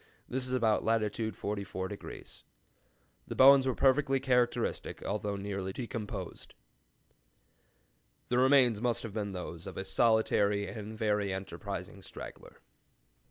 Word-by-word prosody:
This 130 0 -2
is - - -3
about 115 -4 +2
latitude 110 0 0
44°. 100 -1 -6 0.9
The - - -5
bones 135 0 +7
were 130 - +1
perfectly 135 0 +3
characteristic, 125 -2 0
although 105 0 -2
nearly 100 -1 -4
decomposed.'" 105 -6 -6 1.7
The 125 - +2
remains 130 -5 +5
must 120 -1 0
have 115 -3 -6
been 100 -2 -3
those 90 -1 -6
of 95 - -8
a 95 - -3
solitary 105 -3 +2
and 110 -1 -7
very 105 -2 0
enterprising 95 +1 -6
straggler. - - -10
110 Hz, 115 wpm, -31 LUFS, 100-125 Hz, 1.7 s, bones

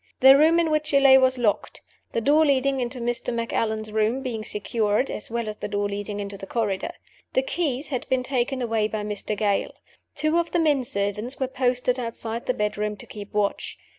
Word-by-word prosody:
The 265 +1 +9
room 320 +4 +5
in 330 -2 +1
which 305 0 +1
she 280 -2 +4
lay 270 -1 +7
was 260 0 +3
locked; 225 -4 0 0.3
the 230 - -1
door 295 +6 +4
leading 275 -2 +2
into 250 +1 -3
Mr. 240 +1 -1
Macallan's 220 -2 -2
room 220 +5 0
being 230 -4 -3
secured, 210 +3 0
as - - -5
well 235 -1 -2
as 210 0 -5
the - - -4
door 205 0 -1
leading 205 0 -4
into 200 -1 -6
the 195 - -8
corridor. 205 -5 -1 0.4
The 260 - +2
keys 285 -2 -2
had 255 -4 -4
been 260 -1 +1
taken 255 0 -1
away 225 -2 +1
by 215 -1 -4
Mr. 210 0 -3
Gale. 200 -1 0 0.4
Two 310 +2 +1
of 340 - -1
the 345 - 0
men 295 -5 +2
servants 210 +1 -2
were 265 - +1
posted 250 -1 0
outside 230 -1 -4
the 255 - +2
bedroom 210 0 -2
to - - -10
keep 205 -1 -9
watch. 205 -1 -1
235 Hz, 205 wpm, -24 LUFS, 210-265 Hz, 0.4 s, The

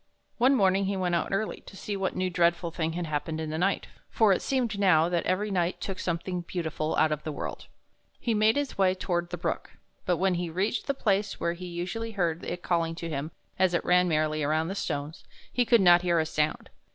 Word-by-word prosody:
One 260 +3 +5
morning 195 -3 +3
he 195 0 -1
went 180 -2 0
out 170 - +1
early, 205 +3 -2
to 195 - -11
see 205 - -4
what 195 -1 -2
new 185 - 0
and 180 - -3
dreadful 170 -1 +2
thing 160 -1 -2
had 175 0 -3
happened 155 +1 -3
in 160 -1 -3
the 155 - -2
night, 195 +2 +1 0.2
for 215 -3 +4
it - - -1
seemed 240 -6 -1
now 170 -4 +4
that 175 -1 0
every 200 +3 0
night 175 -2 0
took 195 -2 -5
something 175 +1 -2
beautiful 160 -3 -3
out 155 - +3
of 150 -1 -1
the 155 - -3
world. 145 - -6 0.5
He 235 - 0
made 215 +1 +4
his 285 -7 -2
way 185 -1 +4
toward 175 -2 -2
the 175 - -4
brook, 170 - -3 0.3
but 180 -1 +2
when 190 +1 +2
he 175 -1 -2
reached 190 +8 -1
the 280 - 0
place 205 -4 0
where 170 0 0
he 180 +1 -8
usually 180 +7 -4
heard 170 -4 -1
it 175 0 -5
calling 165 -2 0
to 170 0 -5
him 150 0 -3 0.3
as 185 -2 +3
it - - -1
ran 180 0 +4
merrily 155 -1 +1
over 155 +2 +1
the 190 - -3
stones, 145 -5 -4 0.3
he 245 - +2
could 235 -1 +5
not 175 -1 +7
hear 175 -1 +2
a 160 - +2
sound. 155 -1 -1
175 Hz, 235 wpm, -28 LUFS, 165-195 Hz, 0.5 s, not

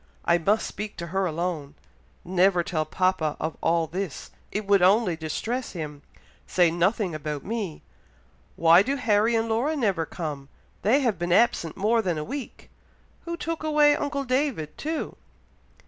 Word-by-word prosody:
I 170 0 +4
must 205 +6 +2
speak 210 0 -6
to 170 - -4
her 190 -1 +1
alone. 160 -3 -3 0.5
Never 180 0 +3
tell 155 -2 -1
papa 185 -5 0
of 160 - -3
all 165 0 +2
this, 180 0 -5 0.2
it 210 +1 -3
would 200 -1 +4
only 190 0 +4
distress 220 - -3
him 150 -4 -6 0.5
say 175 -3 +3
nothing 180 +2 +1
about 150 -2 -4
me. 210 -7 -4 0.7
Why 170 +2 +6
do 270 +7 0
Harry 225 -2 +2
and 225 0 +1
Laura 240 +8 0
never 195 - 0
come? 145 -5 -6 0.3
They 250 +8 +3
have 235 -9 0
been 175 0 -2
absent 175 -5 +2
more 220 +4 +2
than 180 -6 -1
a 150 - -2
week! 270 - -7 0.5
Who 340 0 -4
took 330 -1 -4
away 300 -1 +4
uncle 285 -1 -2
David 255 - -1
too?" 315 +1 -4
190 Hz, 160 wpm, -26 LUFS, 165-235 Hz, 0.7 s, Why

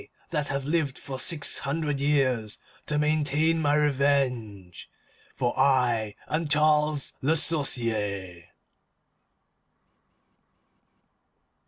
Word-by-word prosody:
that 150 -3 -1
have 140 -1 -3
lived 150 -3 -1
for 135 -1 -7
six 155 -1 +2
hundred 145 0 -2
years 130 -7 0 0.3
to 150 - -1
maintain 155 +2 +1
my 145 -1 +2
revenge, 130 - -1 0.5
FOR 120 - -1
I 120 -6 +1
AM 160 +1 -2
CHARLES 150 -1 +2
LE 155 +5 +2
SORCIER!" 110 - 0
140 Hz, 85 wpm, -26 LUFS, 120-150 Hz, 0.5 s, six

